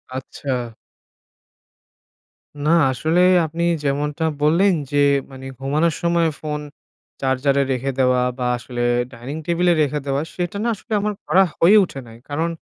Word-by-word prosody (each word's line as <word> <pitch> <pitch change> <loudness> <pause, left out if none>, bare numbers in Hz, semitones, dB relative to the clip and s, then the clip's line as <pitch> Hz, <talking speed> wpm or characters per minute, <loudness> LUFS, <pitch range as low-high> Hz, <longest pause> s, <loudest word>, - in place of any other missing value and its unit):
আচ্ছা। 130 -2 -4 1.9
না - - +2 0.2
আসলেই 170 +8 +3
আপনি 165 +2 -3 0.2
যেমনটা 150 +3 -1 0.2
বললেন 175 +6 +4 0.2
যে 145 - 0 0.3
মানে 130 0 -10
ঘুমানোর 150 +4 +1
সময় 170 -1 +2
ফোন 150 -1 -4 0.6
চার্জারে 135 +1 +1
রেখে 135 +1 -1
দেওয়া 125 -1 +3 0.2
বা 125 - -2
আসলে 120 0 -6 0.3
ডাইনিং 125 +6 -7
টেবিলে 175 +1 +2
রেখে 150 0 0
দেওয়া, 140 0 0
সেটা 175 +2 -3
না 235 - 0
আসলে 220 +2 -8
আমার 210 +1 -1
করা 185 +6 +5 0.2
হয়ে 195 +6 +6
উঠে 140 -7 -6
নাই। 115 0 -13
কারণ 160 +4 -1
150 Hz, 140 wpm, -21 LUFS, 135-170 Hz, 1.9 s, হয়ে